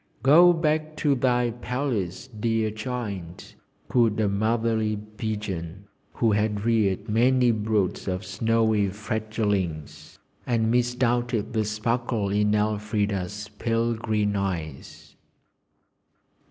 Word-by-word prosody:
'Go 165 Hz, +6 st, +7 dB
back 155 Hz, -2 st, 0 dB
to 145 Hz, -2 st, +2 dB
thy 125 Hz, -2 st, +1 dB
palace, 120 Hz, -5 st, -3 dB
dear 115 Hz, -2 st, -1 dB
child!' 105 Hz, -6 st, -6 dB, 0.3 s
cooed 115 Hz, -4 st, +2 dB
a 110 Hz, -, +2 dB
motherly 110 Hz, +1 st, 0 dB
pigeon 105 Hz, -4 st, -5 dB, 0.3 s
who 115 Hz, -2 st, +2 dB
had 105 Hz, 0 st, 0 dB
reared 110 Hz, -3 st, +1 dB
many 125 Hz, +3 st, +3 dB
broods 105 Hz, -4 st, -1 dB
of 90 Hz, 0 st, -2 dB
snowy 110 Hz, +1 st, +1 dB
fledglings, 105 Hz, -, -3 dB, 0.3 s
and 115 Hz, -2 st, +1 dB
misdoubted 120 Hz, -2 st, 0 dB
the 110 Hz, -2 st, +1 dB
sparkle 110 Hz, 0 st, -1 dB
in 105 Hz, +1 st, +2 dB
Elfrida's 105 Hz, -1 st, -1 dB
pale 115 Hz, 0 st, +1 dB
green 105 Hz, -2 st, -1 dB
eyes. 85 Hz, -8 st, -5 dB
110 Hz, 100 wpm, -25 LUFS, 105-120 Hz, 0.3 s, Go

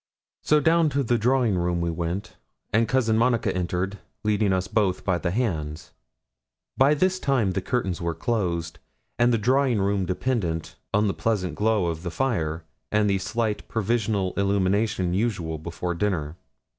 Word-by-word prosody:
So 150 Hz, -, +3 dB
down 160 Hz, +1 st, +3 dB
to 140 Hz, -, +2 dB
the 120 Hz, -1 st, +1 dB
drawing 120 Hz, -4 st, +2 dB
room 85 Hz, 0 st, 0 dB
we 85 Hz, 0 st, 0 dB
went; 85 Hz, +4 st, -4 dB, 0.4 s
and 115 Hz, +1 st, +3 dB
Cousin 115 Hz, -3 st, +2 dB
Monica 120 Hz, -4 st, +2 dB
entered, 90 Hz, +2 st, -2 dB, 0.2 s
leading 105 Hz, -1 st, +2 dB
us 95 Hz, 0 st, 0 dB
both 100 Hz, -5 st, 0 dB
by 95 Hz, -3 st, +1 dB
the 85 Hz, -, -1 dB
hands. 80 Hz, -8 st, -2 dB, 0.8 s
By 140 Hz, +3 st, +4 dB
this 185 Hz, +4 st, +1 dB
time 130 Hz, -, +1 dB
the 95 Hz, -, -1 dB
curtains 95 Hz, -5 st, -2 dB
were 85 Hz, -1 st, -2 dB
closed, 85 Hz, -5 st, -2 dB, 0.4 s
and 120 Hz, 0 st, +4 dB
the 115 Hz, -, +3 dB
drawing 125 Hz, +1 st, +2 dB
room 100 Hz, -1 st, 0 dB
dependent 90 Hz, -5 st, -2 dB, 0.2 s
on 105 Hz, +1 st, +2 dB
the 100 Hz, -, 0 dB
pleasant 95 Hz, -7 st, -1 dB
glow 105 Hz, +1 st, +1 dB
of 80 Hz, -1 st, -2 dB
the 90 Hz, -, -4 dB
fire, 85 Hz, -8 st, -1 dB, 0.3 s
and 105 Hz, 0 st, +3 dB
the 100 Hz, -1 st, +2 dB
slight 110 Hz, +2 st, -2 dB
provisional 110 Hz, -3 st, 0 dB
illumination 100 Hz, -1 st, +1 dB
usual 90 Hz, -7 st, -1 dB
before 85 Hz, +2 st, -4 dB
dinner. 85 Hz, -5 st, -1 dB
100 Hz, 160 wpm, -25 LUFS, 90-115 Hz, 0.8 s, By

